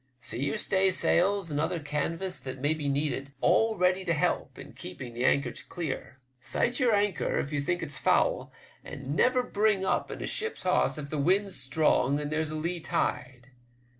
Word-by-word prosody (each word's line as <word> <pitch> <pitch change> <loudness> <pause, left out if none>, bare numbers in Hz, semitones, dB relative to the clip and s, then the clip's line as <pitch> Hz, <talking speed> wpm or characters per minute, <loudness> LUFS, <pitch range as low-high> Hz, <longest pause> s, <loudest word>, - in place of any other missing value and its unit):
See 120 +2 -3
your 140 - -1
staysails 190 -1 +2
and 145 - -1
other 165 +3 0
canvas 165 +5 -2
that 130 -1 -6
may 145 +4 +2
be 150 -3 -2
needful 140 -1 -2
all 225 -1 +3
ready 185 +1 +2
to 170 -2 +1
help 150 - -1
in - - -10
keeping 120 +6 -8
the 120 +1 -3
anchor 140 -2 +3 0.2
clear. 150 -5 -5 0.2
Sight 240 - -1
your 240 -5 +4
anchor 205 -2 0
if 145 - -2
you 145 - 0
think 175 +5 -1
it's 145 -2 -5
foul, - - +2 0.3
and 140 +3 -5
never 255 +6 +3
bring 210 -4 +1
up - - 0
in - - -6
a - - -2
ship's 450 0 -3
hawse - - +2
if 145 -1 -6
the 155 - -2
wind's 190 +6 +2
strong 140 0 +2
and 150 0 -4
there's 155 0 0
a 155 - -4
lee 170 +3 -2
tide. 125 -5 -3
155 Hz, 190 wpm, -28 LUFS, 140-190 Hz, 0.3 s, your